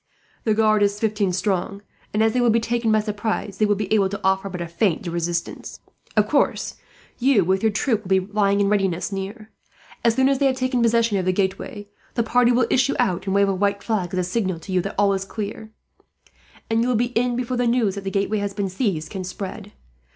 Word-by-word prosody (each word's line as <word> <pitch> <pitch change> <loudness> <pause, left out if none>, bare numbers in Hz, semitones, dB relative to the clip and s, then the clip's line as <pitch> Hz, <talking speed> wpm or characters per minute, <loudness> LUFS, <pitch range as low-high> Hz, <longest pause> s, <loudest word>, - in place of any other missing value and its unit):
The 215 -2 +2
guard 215 -1 +3
is 205 0 +2
fifteen 210 -3 0
strong 195 +1 -2 0.3
and, 215 +1 +2
as 220 0 +2
they 250 - +2
will 240 - +4
be 230 +1 +4
taken 230 0 0
by 215 0 +4
surprise, 210 -2 -3
they 215 - +3
will 205 - +2
be 205 0 -2
able 200 -3 +3
to 200 - -5
offer 190 +1 +1
but 180 -1 -6
a 170 - -4
faint 170 +1 0
resistance. 170 0 -3 0.4
"Of - - +4
course, - - 0 0.4
you 245 -7 +3
with 190 +2 +1
your 220 -1 +2
troop 220 +1 0
will 205 - -12
be 190 0 +4
lying 200 +1 +1
in 200 - +2
readiness 195 -3 0
near. 205 +3 -6 0.5
As 230 -1 +3
soon 265 +1 +3
as 275 -1 +2
they 275 - +4
have 260 - +1
taken 255 -1 0
possession 230 -3 +2
of 185 - -2
the 185 - +3
gateway, 200 +3 -2 0.3
the 235 - +2
party 245 +2 +3
will 245 0 +3
issue 270 +2 +2
out 195 -6 0
and 190 - 0
wave 200 0 +4
a - - +1
white 200 +1 0
flag, 195 -6 -1
as 185 - -3
a 180 - +1
signal 185 -1 -1
to 190 - -8
you 185 -1 +2
that 195 - -5
all 200 -1 +3
is 195 0 -1
clear; 215 +2 -6 1.0
and 225 0 +1
you 240 - +1
will 250 - +1
be 240 +2 0
in 245 +1 +1
before 250 0 -2
the 245 0 +1
news 235 -4 +2
that 200 0 -6
the 195 - -2
gateway 200 +2 0
has 200 -1 -3
been 200 -2 -1
seized 185 -6 -2
can 190 -2 -4
spread. 195 +3 -7
205 Hz, 240 wpm, -22 LUFS, 190-230 Hz, 1.0 s, will